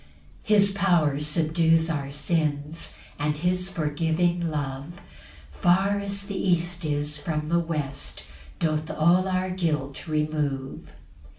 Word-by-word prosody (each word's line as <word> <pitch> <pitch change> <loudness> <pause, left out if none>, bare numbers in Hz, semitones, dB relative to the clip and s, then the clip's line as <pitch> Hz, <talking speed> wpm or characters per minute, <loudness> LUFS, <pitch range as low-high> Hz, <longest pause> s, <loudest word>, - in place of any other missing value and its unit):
4 215 - +5
His 200 -1 +6
power 175 -8 +2
subdues 160 +1 +2
our 145 -4 -2
sins; 150 +1 -1 0.2
And 150 0 0
his 180 +3 0
forgiving 165 +1 0
love, 145 +2 -4 0.5
Far 190 - +2
as 200 0 -2
the 200 0 -6
east 175 -2 0
is 145 -1 -1
from 150 0 -3
the 170 +1 +3
west, 150 -4 -4 0.4
Doth 155 -1 0
all 175 +4 +3
our 185 0 0
guilt 155 -6 -2
remove. 150 -3 -2
160 Hz, 120 wpm, -26 LUFS, 150-180 Hz, 0.5 s, His